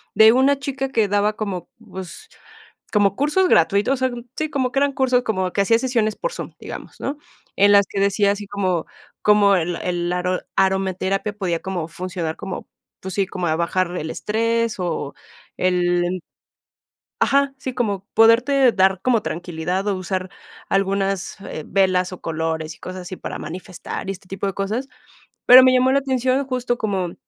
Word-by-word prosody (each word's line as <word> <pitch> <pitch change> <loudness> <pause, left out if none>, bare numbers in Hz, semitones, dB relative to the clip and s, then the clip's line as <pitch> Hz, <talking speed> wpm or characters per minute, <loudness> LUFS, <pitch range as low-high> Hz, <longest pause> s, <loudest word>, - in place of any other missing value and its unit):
de 220 +1 +8
una 270 +2 +3
chica 270 -1 -3
que 225 -5 +2
daba 205 +1 +1
como, 190 -5 -4
pues, 190 - -9 0.6
como 200 -2 +3
cursos 300 - +2
gratui 200 - +4
O 270 - +3
sea, 260 0 0 0.3
sí, 310 -1 -1
como 260 -4 -1
que 270 - +1
eran 285 0 +2
cursos, 255 -2 +2
como 190 -5 -1
que 200 - +2
hacía 225 +3 +3
sesiones 230 -5 0
por - - -3
Zoom, - - -7
digamos, - - -9
¿no? 285 +2 -3 0.4
En 200 +1 +5
las 200 -1 +6
que 200 - -3
decía 200 0 +3
así 205 0 -5
como 185 -4 -1 0.4
como 205 -1 +5
el 175 0 -1
el 175 -1 -2
aro 180 0 -1 0.2
aromaterapia 190 +1 0
podía 185 -5 -2
como 185 -4 -3
funcionar 175 -2 -4
como, 195 -2 -7 0.3
pues 190 0 -6
sí, 195 -2 +1
como 180 -2 -3
a 155 - +1
bajar 175 +1 -1
el 160 - -4
estrés, 230 +1 0
o 160 -5 -3 0.4
el 175 -1 +2
el 180 -1 -3 1.0
ajá, 280 0 +2
sí, 260 -1 -4
como 200 -5 -2
poderte 240 +3 +5
dar 190 -1 +3
como 235 -4 +2
tranquilidad, 175 +3 -3
o 200 - +1
usar 185 0 -3 0.4
algunas, 195 -1 -1
eh, 155 - -6
velas, 185 -1 +2
o 185 - -8
colores 160 -1 -3
y - - -21
cosas 185 0 -7
así 180 +1 -7
para - - -6
manifestar, 180 +4 -7
y 195 - 0
este 185 -1 -13
tipo 195 +1 -4
de 195 - -1
cosas. 215 +7 -2 0.6
Pero 255 +1 +10
me 255 0 +6
llamó 255 +1 +4
la 275 - +3
atención 260 0 0
justo 250 -2 -1
como 190 -5 -2
195 Hz, 180 wpm, -21 LUFS, 185-245 Hz, 1.0 s, Pero